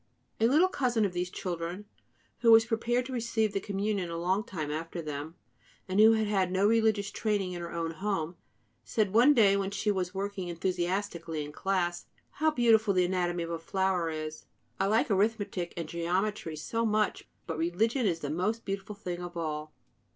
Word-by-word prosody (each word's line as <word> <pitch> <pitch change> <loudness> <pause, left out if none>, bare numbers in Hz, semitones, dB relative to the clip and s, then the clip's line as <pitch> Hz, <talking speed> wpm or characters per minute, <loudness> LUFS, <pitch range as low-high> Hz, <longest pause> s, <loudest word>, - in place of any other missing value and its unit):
A 225 - +4
little 310 +9 +5
cousin 245 - +1
of 190 - -2
these 180 0 -2
children, 180 +1 -4 0.5
who 235 -1 +5
was 225 0 +8
prepared 240 +2 0
to 260 - -6
receive 225 -3 0
the - - 0
Communion 200 -2 -2
a 165 - -4
long 185 +5 +1
time 160 -9 -4
after 165 +3 -4
them, 155 0 -5 0.5
and 190 +2 0
who 220 +1 +8
had 220 -1 +1
had 195 -3 +1
no 190 +2 +2
religious 220 -3 +2
training 205 -4 -1
in 175 -1 -5
her 170 - -6
own 165 -1 -2
home, 170 -1 -2 0.5
said 210 -3 0
one 250 +7 +6
day, 200 -5 +5
when 195 -1 0
she 210 +1 0
was 185 -2 -1
working 195 -1 -4
enthusiastically 175 -2 -2
in 145 - -8
class: 175 0 -1 0.2
"How 315 +2 +1
beautiful 225 -7 +3
the 180 -1 +4
anatomy 175 -1 0
of 165 - -5
a 165 - -3
flower 185 0 0
is! 155 -1 -6 0.3
I - - +2
like 220 +2 +2
arithmetic 200 -3 0
and 165 -2 -3
geometry 175 +1 -1
so 225 +9 -2
much! 215 -1 0 0.2
But 165 -2 -4
religion 220 +9 +1
is 165 -3 -1
the 145 - -3
most 210 +8 -1
beautiful 195 +1 -4
thing 180 -3 -5
of 175 -1 -7
all." 155 -2 -3
190 Hz, 190 wpm, -30 LUFS, 170-215 Hz, 0.5 s, was